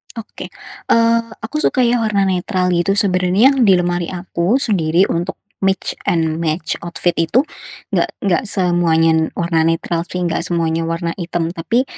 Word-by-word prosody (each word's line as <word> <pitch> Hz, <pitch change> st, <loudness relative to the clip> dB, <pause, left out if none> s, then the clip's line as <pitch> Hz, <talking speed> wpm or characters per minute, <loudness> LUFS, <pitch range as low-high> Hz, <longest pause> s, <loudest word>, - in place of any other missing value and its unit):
Oke, 230 Hz, -2 st, -8 dB, 0.4 s
eee, 230 Hz, 0 st, +3 dB, 0.2 s
aku 265 Hz, +7 st, -3 dB
suka, 260 Hz, -4 st, +2 dB
ya, 240 Hz, 0 st, +2 dB
warna 210 Hz, -3 st, +1 dB
netral, 185 Hz, 0 st, 0 dB
gitu. 175 Hz, +3 st, +1 dB
Sebenarnya 190 Hz, +5 st, +3 dB
yang 260 Hz, -6 st, +2 dB
di 190 Hz, -, +7 dB
lemari 175 Hz, -1 st, -1 dB
aku 180 Hz, +4 st, -1 dB
sendiri 185 Hz, -, +2 dB
untuk 175 Hz, +3 st, -2 dB, 0.2 s
mix 195 Hz, 0 st, -1 dB
and 160 Hz, -1 st, +1 dB
match 160 Hz, 0 st, -2 dB
outfit 175 Hz, +1 st, 0 dB
itu 165 Hz, +10 st, +3 dB, 0.5 s
enggak, -, -, +1 dB
enggak 180 Hz, -4 st, +1 dB
semuanya 175 Hz, -4 st, +2 dB, 0.2 s
warna 165 Hz, -2 st, +1 dB
netral, 165 Hz, +1 st, -1 dB
sih, 180 Hz, -, -4 dB
enggak 170 Hz, 0 st, -1 dB
semuanya 165 Hz, -1 st, -1 dB
warna 165 Hz, 0 st, -2 dB
hitam. 170 Hz, -1 st, -2 dB
Tapi 185 Hz, +9 st, 0 dB
175 Hz, 155 wpm, -18 LUFS, 165-200 Hz, 0.5 s, di